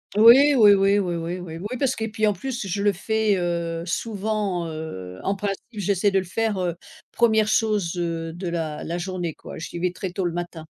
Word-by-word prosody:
Oui. 250 Hz, +7 st, +8 dB
Oui 210 Hz, -4 st, +8 dB
oui, 195 Hz, +1 st, +3 dB
oui 175 Hz, -3 st, -1 dB
oui, 170 Hz, +2 st, -4 dB
oui 165 Hz, -2 st, -7 dB
oui, 210 Hz, +7 st, -4 dB
parce 270 Hz, 0 st, +1 dB
que 220 Hz, -, -4 dB
et -, -, -3 dB
puis 215 Hz, 0 st, 0 dB
en -, -, +4 dB
plus, 245 Hz, -2 st, -4 dB
je 195 Hz, +2 st, -2 dB
le 205 Hz, 0 st, +3 dB
fais, 220 Hz, +2 st, +1 dB
heu, 170 Hz, -1 st, -2 dB
souvent, 205 Hz, -2 st, -2 dB
heu, 95 Hz, -, -7 dB
en 195 Hz, -, 0 dB
principe 195 Hz, 0 st, -3 dB
j'essaie 200 Hz, -1 st, +1 dB
de 195 Hz, -, +3 dB
le 185 Hz, -, -4 dB
faire, 220 Hz, +3 st, -1 dB
heu, 175 Hz, -2 st, -1 dB, 0.4 s
1re 220 Hz, -2 st, +3 dB
chose, 210 Hz, -6 st, +1 dB
heu, 165 Hz, -1 st, -2 dB
de 175 Hz, +2 st, -6 dB
la 165 Hz, -3 st, -3 dB
la 170 Hz, -, -3 dB
journée 175 Hz, -2 st, -3 dB
quoi, -, -, -10 dB
j'y 165 Hz, -, -6 dB
vais 180 Hz, +1 st, 0 dB
très 185 Hz, 0 st, -5 dB
tôt 190 Hz, +1 st, -3 dB
le 175 Hz, -, 0 dB
matin. 170 Hz, -2 st, -5 dB
190 Hz, 220 wpm, -24 LUFS, 170-210 Hz, 0.4 s, Oui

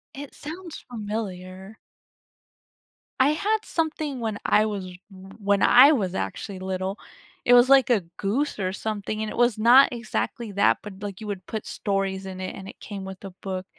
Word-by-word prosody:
It 285 Hz, 0 st, -9 dB
sounds 335 Hz, +2 st, -8 dB
familiar. 200 Hz, -2 st, -6 dB, 1.4 s
I 260 Hz, +2 st, +5 dB
had 410 Hz, +8 st, +1 dB
something 310 Hz, -4 st, -2 dB
when 220 Hz, -3 st, -2 dB
I 215 Hz, -, +4 dB
was 205 Hz, -3 st, -3 dB, 0.3 s
w 190 Hz, 0 st, -13 dB
when 200 Hz, -1 st, +1 dB
I 265 Hz, +5 st, +8 dB
was 190 Hz, -, 0 dB
actually 195 Hz, -3 st, -4 dB
little. 190 Hz, +1 st, -3 dB, 0.5 s
It 245 Hz, -, +6 dB
was 245 Hz, +1 st, +7 dB
like 270 Hz, -2 st, +6 dB
a 230 Hz, -5 st, +4 dB, 0.2 s
goose 245 Hz, +10 st, -1 dB
or 185 Hz, -2 st, -1 dB
something, 215 Hz, +1 st, -4 dB
and 220 Hz, -, -2 dB
it -, -, -7 dB
was 240 Hz, -2 st, +3 dB
not 240 Hz, +5 st, +7 dB
exactly 225 Hz, -, -3 dB
that 200 Hz, -, +3 dB
but, 200 Hz, -3 st, -10 dB
like, 200 Hz, -3 st, -6 dB
you 215 Hz, -, -7 dB
would 190 Hz, -3 st, -5 dB
put 220 Hz, -2 st, -5 dB
stories 195 Hz, -1 st, -2 dB
in 185 Hz, -1 st, -7 dB
it, 185 Hz, -, -5 dB
and 195 Hz, 0 st, -9 dB
it -, -, -12 dB
came 200 Hz, -2 st, -7 dB
with 190 Hz, -1 st, -8 dB
a 195 Hz, -, -7 dB
book, 185 Hz, -1 st, -4 dB
210 Hz, 185 wpm, -25 LUFS, 190-245 Hz, 1.4 s, I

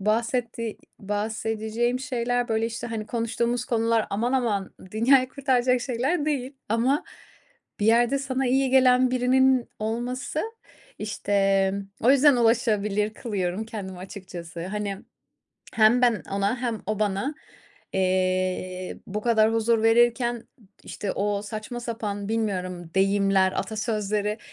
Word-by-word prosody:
bahsettiği 230 Hz, +2 st, -1 dB, 0.2 s
bahsedeceğim 220 Hz, +3 st, -2 dB
şeyler, 245 Hz, -1 st, -1 dB
böyle, 225 Hz, 0 st, +1 dB
işte, 230 Hz, 0 st, -5 dB
hani 220 Hz, -2 st, -4 dB
konuştuğumuz 235 Hz, +1 st, -1 dB
konular 230 Hz, -1 st, +1 dB
aman 235 Hz, +5 st, 0 dB
aman 215 Hz, -7 st, 0 dB, 0.2 s
dünyayı 255 Hz, +4 st, +4 dB
kurtaracak 255 Hz, -2 st, +1 dB
şeyler 270 Hz, +6 st, -1 dB
değil 275 Hz, -3 st, -2 dB, 0.2 s
ama 245 Hz, +6 st, +1 dB, 0.8 s
bir 205 Hz, -, +1 dB
yerde 240 Hz, +4 st, +4 dB
sana 265 Hz, -1 st, -1 dB
iyi 265 Hz, +1 st, +2 dB
gelen 255 Hz, -1 st, +5 dB
birinin 255 Hz, 0 st, +3 dB
olması 245 Hz, +7 st, -3 dB, 0.6 s
işte, 195 Hz, -2 st, +1 dB, 0.3 s
o 245 Hz, -, +4 dB
yüzden 280 Hz, 0 st, +6 dB
ulaşılır 210 Hz, -3 st, +2 dB
kılıyorum 200 Hz, -3 st, -3 dB
kendimi 200 Hz, -5 st, -7 dB
açıkçası. 180 Hz, -3 st, -8 dB
Hani, 205 Hz, 0 st, -3 dB, 0.8 s
hem 230 Hz, +3 st, +5 dB
ben 235 Hz, -5 st, +3 dB
ona 200 Hz, +5 st, 0 dB
hem 230 Hz, -4 st, -2 dB
o 215 Hz, 0 st, -1 dB
bana, 210 Hz, +7 st, -1 dB, 0.6 s
eee, 185 Hz, -1 st, -1 dB
bu 210 Hz, +2 st, -3 dB
kadar 225 Hz, -2 st, +3 dB
huzur 225 Hz, 0 st, +2 dB
verirken, 240 Hz, +1 st, +3 dB, 0.4 s
işte, 200 Hz, -, -4 dB
o 205 Hz, 0 st, -1 dB
saçma 215 Hz, +3 st, -6 dB
sapan, 210 Hz, -4 st, -4 dB
bilmiyorum, 185 Hz, -6 st, -2 dB
deyimler, 195 Hz, -1 st, +3 dB
atasözleri 210 Hz, 0 st, -2 dB
225 Hz, 115 wpm, -25 LUFS, 205-245 Hz, 0.8 s, yüzden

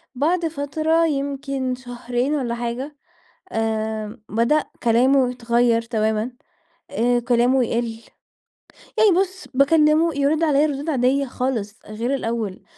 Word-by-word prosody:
بعد 330 Hz, +5 st, +1 dB
فترة 315 Hz, +2 st, 0 dB
يمكن 275 Hz, -2 st, -2 dB
شهرين 245 Hz, +2 st, -3 dB
والّا 240 Hz, -4 st, -2 dB
حاجة، 245 Hz, +5 st, -4 dB, 0.6 s
آآ 220 Hz, 0 st, -2 dB
بدأ 235 Hz, +8 st, +2 dB, 0.2 s
كلامه 250 Hz, +2 st, +3 dB
يتغيّر 235 Hz, -1 st, +1 dB
تمامًا، 220 Hz, 0 st, -1 dB, 0.6 s
آآ 240 Hz, +3 st, +2 dB
كلامه 245 Hz, +2 st, +2 dB
يقل، 230 Hz, -1 st, -2 dB, 1.0 s
يعني 430 Hz, -2 st, +5 dB
بُص 380 Hz, -1 st, -5 dB
باكلّمه 305 Hz, +4 st, +4 dB
يرد 285 Hz, +3 st, +1 dB
عليّا 300 Hz, -1 st, +3 dB
ردود 290 Hz, +2 st, -4 dB
عاديّة 270 Hz, 0 st, +2 dB
خالص، 240 Hz, -5 st, -3 dB
غير 230 Hz, +5 st, -3 dB
الأوّل، 225 Hz, -6 st, -3 dB
250 Hz, 115 wpm, -22 LUFS, 235-285 Hz, 1.0 s, يعني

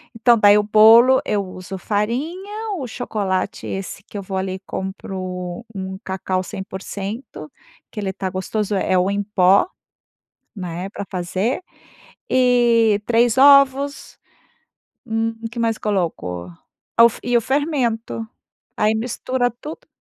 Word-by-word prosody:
Então, 235 Hz, +1 st, +4 dB
daí 205 Hz, -1 st, +6 dB
o -, -, +1 dB
bolo, 225 Hz, +5 st, +7 dB
eu 205 Hz, -1 st, 0 dB
uso 185 Hz, 0 st, -8 dB
farinha, 330 Hz, -, -3 dB
o 265 Hz, -6 st, -5 dB
chocolate 200 Hz, -6 st, -3 dB
esse 195 Hz, 0 st, -5 dB
que 215 Hz, -, -18 dB
eu 200 Hz, -, -3 dB
vou 190 Hz, 0 st, -5 dB
ali 190 Hz, 0 st, -3 dB
compro 185 Hz, +1 st, -6 dB
um 190 Hz, -1 st, -5 dB
cacau 190 Hz, 0 st, -2 dB
100%, 195 Hz, -, -7 dB, 0.4 s
que 215 Hz, -, -7 dB
ele 195 Hz, -2 st, -2 dB
tá 190 Hz, 0 st, -3 dB
gostoso 205 Hz, +3 st, -2 dB
é 190 Hz, -, -1 dB
é -, -, +4 dB
o 180 Hz, +2 st, +2 dB
em 205 Hz, 0 st, -1 dB
pó, 195 Hz, -, +4 dB, 0.9 s
né, 180 Hz, -1 st, -5 dB
pra 200 Hz, -, -5 dB
fazer. 185 Hz, -, -2 dB, 0.7 s
E, 235 Hz, -4 st, +3 dB
3 235 Hz, +1 st, +3 dB
ovos. 275 Hz, +1 st, +4 dB, 0.9 s
Hum. 225 Hz, -1 st, -1 dB
O -, -, -2 dB
que 235 Hz, -, -9 dB
mais 230 Hz, -1 st, +1 dB
coloco? 165 Hz, -, -2 dB, 0.5 s
Ah 230 Hz, -, +7 dB
o -, -, +8 dB
f 230 Hz, -, -9 dB
e 245 Hz, 0 st, +1 dB
o 235 Hz, -, +4 dB
fermento. 245 Hz, -5 st, -1 dB, 0.5 s
Aí 215 Hz, +1 st, +2 dB
mistura 245 Hz, +2 st, -1 dB
tudo. 295 Hz, +7 st, -10 dB
215 Hz, 140 wpm, -21 LUFS, 190-240 Hz, 0.9 s, o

